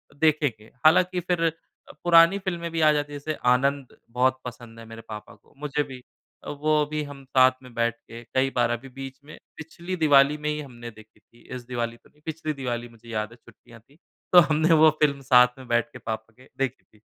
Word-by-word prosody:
देखेंगे। 145 -8 0
हालाँकि 180 +3 +4
फिर 175 -1 -1
अ, 165 - +3 0.5
पुरानी 170 +3 +6
फ़िल्में 175 -3 -4
भी 165 0 -1
आ 155 -1 +6
जाती 145 -1 -2
है 145 - -5
जैसे 155 +2 -3 0.2
आनंद 135 +1 0
बहुत 130 +2 +1
पसंद 120 -2 -9
है 115 - -11
मेरे 115 0 -10
पापा 105 -1 -9
को - - -28
मुझे 150 0 -1
भी। 130 -3 -10 0.4
अ, - - -8
वो 150 +1 +1
भी 155 0 -2
हम 145 -1 -10
साथ 130 0 +5
में 125 -1 -14
बैठ 115 0 0
के 115 0 -12
कई 130 +3 0
बार 120 -2 +2
अभी 120 +3 -4
बीच 135 +1 -9
में 155 - -12 0.2
पिछली 170 +3 -6
दिवाली 145 -3 +4
में 150 0 -3
ही 150 0 -2
हमने 120 -4 -10
देखी 110 0 -18
थी। 120 - -24
इस 125 -1 -8
दिवाली 120 -2 -3
तो - - -25
नहीं। 150 - -30
पिछली 155 -1 -4
दिवाली 120 -3 -4
मुझे 115 0 -17
याद 110 -1 -3
है - - -13
छुट्टियाँ 120 0 -18
थी। 135 +7 -26 0.4
तो 180 - +11
हमने 155 +2 +3
वो 155 0 +7
फ़िल्म 140 -2 +2
साथ 125 -1 +5
में 130 -1 -12
बैठ 120 0 +1
के - - -10
पापा 110 0 -6
के 130 - -19
देखी 135 -1 -2
थी। 105 - -27
135 Hz, 220 wpm, -25 LUFS, 120-155 Hz, 0.5 s, तो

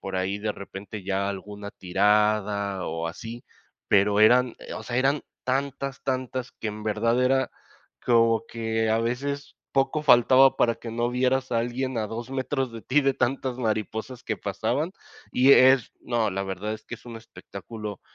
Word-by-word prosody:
por 95 -1 -4
ahí 95 +2 -1
de 105 0 -2
repente 100 +1 -8
ya 100 +1 0
alguna 100 +1 -6
tirada 100 0 +1
o 80 0 -3
así, 115 +8 -8 0.4
pero 100 +1 +4
eran, 125 +3 +5 0.2
o - - -7
sea, 120 +2 -4
eran 135 +3 +2 0.2
tantas, 135 +1 -2
tantas, 130 -1 -3
que 110 - -5
en 105 0 -6
verdad 115 +3 +1
era 130 +1 +2 0.5
como 115 -2 +3
que 110 -1 -1
a 110 - +3
veces, 140 +5 -3 0.2
poco 135 +2 +1
faltaba 130 -1 +6
para 115 -1 +2
que 115 - -8
no 120 +1 -1
vieras 130 +1 0
a 115 - +2
alguien 125 +2 -2
a 110 - -1
2 115 +3 -6
metros 135 -1 -2
de 115 - -7
ti 145 +3 +2
de 135 0 +3
tantas 130 0 -1
mariposas 110 +2 -3
que 110 - -2
pasaban, 110 - -2 0.4
y 130 +2 +6
es 130 -2 +6
no, 115 -3 0
la 95 +1 -2
verdad 95 +2 -4
es 110 - -12
que - - -6
es - - -22
un 115 - -7
espectáculo, 105 -1 -9
115 Hz, 170 wpm, -26 LUFS, 105-130 Hz, 0.5 s, faltaba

